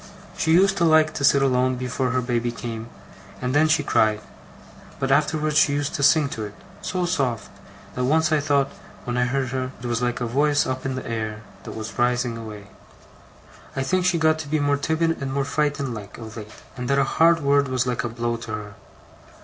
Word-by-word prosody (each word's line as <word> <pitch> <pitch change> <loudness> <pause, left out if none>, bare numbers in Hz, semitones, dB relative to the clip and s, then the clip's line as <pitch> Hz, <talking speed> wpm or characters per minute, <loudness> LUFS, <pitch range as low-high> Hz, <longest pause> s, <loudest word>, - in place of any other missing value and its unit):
She 160 - 0
used 195 +3 +4
to 175 - +1
like 155 -1 +4
to 140 - -4
sit 140 -1 +5
alone 130 -1 +2
before 125 +1 -2
her 130 +1 0
baby 120 -1 -1
came, 115 -1 -6 0.5
and 125 0 -2
then 150 +2 +4
she 155 -1 +2
cried; 110 -5 +2 0.8
but 135 - -1
afterwards 150 +1 +2
she 145 - +4
used 145 0 -1
to - - -3
sing 145 +1 +5
to 110 - -5
it 105 -1 -7 0.3
so 180 -1 -1
soft, 135 - -1 0.4
that 125 - -3
I - - +1
once 155 +3 +3
thought, 145 -3 +2 0.3
when 120 - -3
I 125 0 +2
heard 130 +1 -1
her, 130 0 -2
it 120 - -9
was 120 0 -1
like 120 0 -1
a 120 - -1
voice 145 +4 +2
up 130 +1 -3
in 130 - -2
the 130 - -5
air, 110 -2 -4 0.2
that - - -7
was 110 0 -7
rising 125 -1 +1
away. 105 -3 -9 1.1
'I 135 - -1
think 180 +6 +1
she 180 -2 +3
got 155 -1 +2
to 155 - -6
be 155 +2 0
more 145 0 +2
timid, 160 +2 0
and 135 -1 -3
more 135 0 0
frightened 140 -3 -1
like, 105 -2 -9
of 110 -1 -9
late; 105 -2 -8 0.3
and 125 -1 -5
that 140 - +3
a 140 - +4
hard 165 +4 +3
word 140 0 +3
was 130 -1 0
like 125 0 -1
a 120 - -2
blow 120 0 -2
to 115 -1 -8
her. 105 -1 -6
135 Hz, 220 wpm, -23 LUFS, 120-150 Hz, 1.1 s, sit